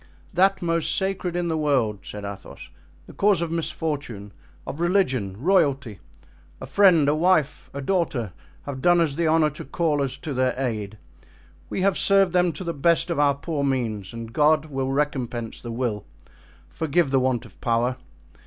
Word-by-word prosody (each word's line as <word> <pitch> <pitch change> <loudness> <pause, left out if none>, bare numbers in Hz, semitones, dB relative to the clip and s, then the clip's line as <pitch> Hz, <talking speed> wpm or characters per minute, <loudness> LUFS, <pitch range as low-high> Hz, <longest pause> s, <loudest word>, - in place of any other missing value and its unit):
"That 190 +1 +3
most 165 -2 +1
sacred 190 -2 -2
in 175 -1 -1
the 160 -1 -1
world," 130 -9 +1
said 105 -1 -8
Athos; 100 -1 -9 0.4
"the - - -13
cause 200 -3 +3
of 170 -1 -2
misfortune, 145 -10 -3 0.3
of 145 - -6
religion, 130 - 0
royalty. 140 - +1 0.6
A - - -7
friend, 180 -7 +4
a 145 - +4
wife, 155 -2 +1
a 140 - -6
daughter, 135 - -1 0.3
have 135 -2 -6
done 175 +3 +4
us 160 -4 +2
the 165 +3 0
honor 155 -1 +3
to 150 - -8
call 150 0 0
us 135 -2 -2
to 150 - -5
their 130 0 +1
aid. 110 -5 -3 0.7
We - - -2
have 195 0 +2
served 195 -2 +3
them 180 -1 +3
to 150 - -7
the 170 -1 -3
best 165 +3 +2
of 160 - -1
our 145 -1 +4
poor 145 0 -3
means, 115 -8 -2
and 115 -1 -8
God 155 +1 +3
will 135 -3 -3
recompense 125 -5 -2
the 120 - -6
will, 115 -4 -2 0.6
forgive 160 -1 0
the 135 - +4
want 130 -2 0
of 105 - -17
power. 120 +2 +1
145 Hz, 175 wpm, -24 LUFS, 125-170 Hz, 0.7 s, friend